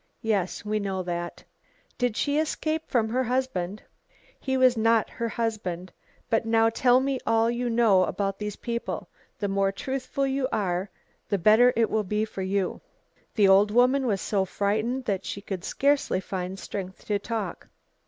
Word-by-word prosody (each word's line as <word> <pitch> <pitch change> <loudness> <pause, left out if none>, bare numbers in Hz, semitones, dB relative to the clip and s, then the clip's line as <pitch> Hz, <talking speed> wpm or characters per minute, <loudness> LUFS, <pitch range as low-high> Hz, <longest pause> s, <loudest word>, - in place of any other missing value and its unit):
"Yes, 205 -3 -1
we 215 0 0
know 190 -2 -2
that." 175 -1 -4 0.6
"Did 245 -3 0
she 290 +1 +1
escape 315 0 -1
from 230 -3 +2
her 255 +3 +1
husband?" 225 -6 -2 0.6
"He 265 -1 -1
was 255 -1 +5
not 225 0 +2
her 230 0 -3
husband. 190 -7 -3 0.3
But 225 - +1
now 225 0 +3
tell 245 +2 +4
me 270 0 -1
all 225 +1 +3
you 240 0 -2
know 225 -6 +4
about 195 -1 -2
these 210 -1 -4
people; 235 -1 -4 0.3
the 205 - -2
more 195 0 +1
truthful 265 +5 -3
you 270 -1 0
are 190 -3 -1 0.4
the 200 - +1
better 215 +7 +6
it 230 -1 +3
will 220 -1 +1
be 210 +2 -1
for 195 - -7
you." 190 0 -1 0.5
The 205 -4 +5
old 195 +2 +6
woman 250 +4 +3
was 200 -4 0
so 200 -2 +1
frightened 215 +7 -1
that 195 -3 -1
she - - -5
could 190 -3 -6
scarcely 280 -6 +1
find 190 0 -4
strength 190 -1 -7
to 205 -1 0
talk. 215 -4 -4
220 Hz, 170 wpm, -26 LUFS, 195-245 Hz, 0.6 s, better